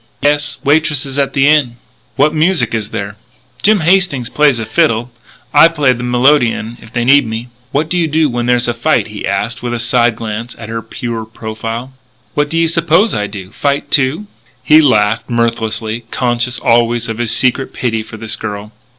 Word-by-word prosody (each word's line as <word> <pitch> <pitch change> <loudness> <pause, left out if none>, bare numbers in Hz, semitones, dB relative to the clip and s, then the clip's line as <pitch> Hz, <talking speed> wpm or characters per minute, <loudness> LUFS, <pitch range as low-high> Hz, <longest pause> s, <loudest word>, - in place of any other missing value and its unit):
"Yes; 145 0 +1
waitresses 145 -2 +1
at 140 - 0
the 135 0 +3
Inn." 145 -6 +3 0.4
"What 150 +5 +2
music 160 0 +1
is 110 -2 -2
there?" 100 +1 -5 0.4
"Jim 210 -2 +3
Hastings 170 -8 +1
plays 145 -4 +3
a 115 - -3
fiddle. 120 -2 +1 0.4
I - - +8
play 150 -6 +2
the 120 - -7
melodeon 125 -2 +1
if 110 - -14
they 120 0 -1
need 140 -1 +5
me." 110 +2 -5 0.2
"What 150 +3 0
do 180 +2 -1
you 165 - +1
do 155 +1 +2
when 120 -2 -2
there's 125 0 +2
a 120 - 0
fight?" 120 +1 0
he 105 -2 -6
asked, 100 +5 -2
with 120 0 -3
a - - -3
side 120 0 +2
glance 115 +1 -5
at 115 -1 -9
her 115 0 -4
pure 115 0 -5
profile. 115 +3 -6 0.4
"What 145 0 0
do 165 - -2
you 165 0 +3
suppose 170 +5 +2
I 105 -1 -1
do? 100 -2 -9
Fight, 140 +4 -2
too?" 140 +8 +1 0.4
He 155 +1 +6
laughed 115 -6 +2
mirthlessly 115 -1 -2
conscious 120 0 -1
always 120 0 +2
of 115 0 -5
his 120 -2 -1
secret 130 +2 +1
pity 115 -3 -2
for 110 0 -10
this 110 0 -3
girl. 105 -1 -6
120 Hz, 190 wpm, -14 LUFS, 115-145 Hz, 0.4 s, I